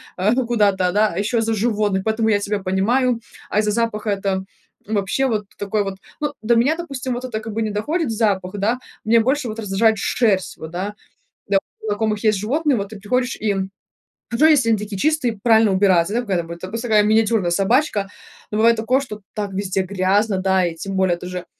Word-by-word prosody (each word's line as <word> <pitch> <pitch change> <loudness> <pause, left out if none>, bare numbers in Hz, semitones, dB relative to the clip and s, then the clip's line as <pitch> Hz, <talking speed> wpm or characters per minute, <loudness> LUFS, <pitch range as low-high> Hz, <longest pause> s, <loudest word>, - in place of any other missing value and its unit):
а, 190 +3 +1
ну, 255 0 +1
куда-то, 200 -6 +2
да, 210 +3 +3
а - - -5
еще 225 +4 0
за 225 0 0
животных. 210 -3 0
Поэтому 220 0 +1
я 210 - +4
тебя 205 0 -2
понимаю. 230 +7 +1 0.3
А - - -2
из-за 210 -1 0
запаха 215 -1 -1
это, 195 -1 -1 0.4
м, 215 - -4
вообще 205 +7 0
вот 215 -5 -1
такой 205 +1 -1
вот. 195 -1 -4 0.2
Ну, 295 -1 -2
до 235 +2 +3
меня, 255 +7 +3
допустим, 275 -7 -4
вот 250 +1 -5
это 230 -4 -3
как 220 0 -7
бы 225 +1 -1
не 215 - -2
доходит 295 - -1
запах, 200 -5 0
да. 225 +5 +1 0.3
Мне 230 +2 +4
больше 260 +3 +1
вот 220 0 -5
раздражает 220 +1 +2
шерсть, 200 -3 0
вот, 160 - -8
да. 190 +4 -4 0.5
Да, 195 -1 +3 0.3
у - - -5
знакомых 215 0 -1
есть 215 -2 +3
животные, 280 +6 +1
вот 200 -1 -3
ты 215 -1 -9
приходишь, 250 +5 -1
и, 210 -2 -1 0.7
хорошо, 265 +7 +4
если 280 -7 +4
они 225 - +3
такие 205 -1 -5
чистые, 300 -4 +1
и - - -15
правильно 225 -2 +4
убираться, 190 -1 +3
да, 240 - +1
какая 200 -6 -1
там 165 - -4
вот. 170 0 -8
Допустим, 230 +7 -5
такая 210 -1 +5
миниатюрная 215 -3 +2
собачка. 205 - +1 0.4
Ну, 210 - -1
бывает 230 +2 +5
такое, 245 +4 +2
что 215 -6 -8
так 205 -2 -3
везде 190 0 -1
грязно, 195 +2 +1
да, 190 -1 +2
и 170 -1 -3
тем 195 +4 -5
более 190 -2 +2
тоже 180 0 -6
215 Hz, 215 wpm, -21 LUFS, 195-230 Hz, 0.7 s, такая